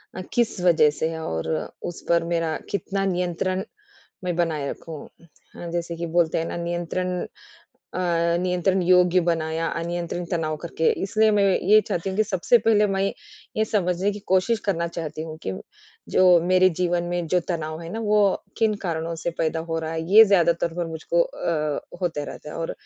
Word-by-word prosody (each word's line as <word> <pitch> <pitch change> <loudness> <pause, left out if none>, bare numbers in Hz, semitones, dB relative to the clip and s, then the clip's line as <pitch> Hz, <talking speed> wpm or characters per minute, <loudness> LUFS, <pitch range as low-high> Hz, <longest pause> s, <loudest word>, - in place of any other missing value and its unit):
अ, 185 - -4
किस 235 -4 +1
वज़ह 170 -4 +5
से 160 - +1
है 160 0 -5
और 80 0 -3 0.4
उस 175 - -12
पर 170 -1 +3
मेरा 165 -2 0
कितना 195 -1 -2
नियंत्रण 185 0 -1 0.6
मैं 180 -1 -1
बनाए 160 -5 0
रखूँ। 160 -3 -8 0.5
अ, 175 - -7
जैसे 170 0 -3
कि 170 - -4
बोलते 165 -2 +2
हैं 165 - -2
ना, - - -4
नियंत्रण 175 +1 -2 0.7
अ, - - -3 0.4
नियंत्रण 180 +1 +1
योग्य 180 0 +5
बनाया, 165 -1 0
अनियंत्रण 170 +1 -3
तनाव 160 -3 -1
करके 165 -1 +1
इसलिए 215 +2 +3
मैं 205 -1 +3 0.2
ये 215 +2 +8
चाहती 175 +3 -2
हूँ 190 - -4
कि 215 - +4
सबसे 200 +3 +3
पहले 210 -2 +4
मैं 195 -1 -1 0.6
ये 220 - +2
समझने 190 -2 0
की 205 - -7
कोशिश 190 +5 +3
करना 170 -4 0
चाहती 160 -2 -5
हूँ 160 -1 -7
कि 95 - -2 0.6
जो - - +6 0.2
मेरे 185 +1 +5
जीवन 175 -1 +1
में 175 -1 -2
जो 180 +3 +2
तनाव 155 -2 -3
है 165 - -7
ना, 225 - -3
वो 210 -3 +2
किन 220 -1 +2
कारणों 165 -1 -2
से - - 0
पैदा 160 0 0
हो 165 0 -1
रहा 160 0 -4
है। 165 0 -2
ये 220 +1 +11
ज़्यादातर 170 -4 +2
मुझको 165 +1 0
अ, 155 -3 -1 0.2
होता 165 -5 -1
रहता 150 - -8
है - - -8
और 165 0 -3
175 Hz, 180 wpm, -24 LUFS, 165-190 Hz, 0.7 s, ये